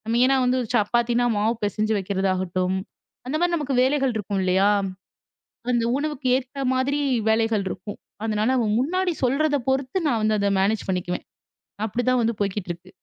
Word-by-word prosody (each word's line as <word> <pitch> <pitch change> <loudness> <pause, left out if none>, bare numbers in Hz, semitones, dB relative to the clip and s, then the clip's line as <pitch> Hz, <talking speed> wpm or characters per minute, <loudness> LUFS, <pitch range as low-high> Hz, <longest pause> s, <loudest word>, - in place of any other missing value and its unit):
மெயினா 255 +3 +4
வந்து 255 +1 +2
சப்பாத்தின்னா 240 +3 +2
மாவு 215 +3 +2
பிசைஞ்சு 215 +2 0
வைக்கிறதாகட்டும். 185 -1 -1 0.5
அந்த 275 - -2
மாதிரி 350 0 +2
நமக்கு 285 -4 -2
வேலைகள் 270 -1 +2
இருக்கும் 200 -2 -2
இல்லையா? 190 +2 +3 1.0
அந்த 235 -1 +2
உணவுக்கு 295 -2 -3
ஏத்த 270 +1 -4
மாதிரி 275 +3 0 0.3
வேலைகள் 220 -2 +2
இருக்கும். 190 +3 -7 0.3
அதனால 215 0 0
அவன் 220 -3 +1
முன்னாடி 360 +6 0
சொல்றத 290 +4 +2
பொறுத்து 265 +5 0
நான் 235 -5 +1
வந்து 215 0 +2
அத 200 0 +1
மேனேஜ் 205 +3 +1
பண்ணிக்குவேன். 180 -1 -3 0.6
அப்படிதான் 245 +3 +1
வந்து 230 +1 +1
போய்க்கிட்டு 200 -2 -2
இருக்கு. 175 +2 -10
225 Hz, 145 wpm, -24 LUFS, 200-265 Hz, 1.0 s, மெயினா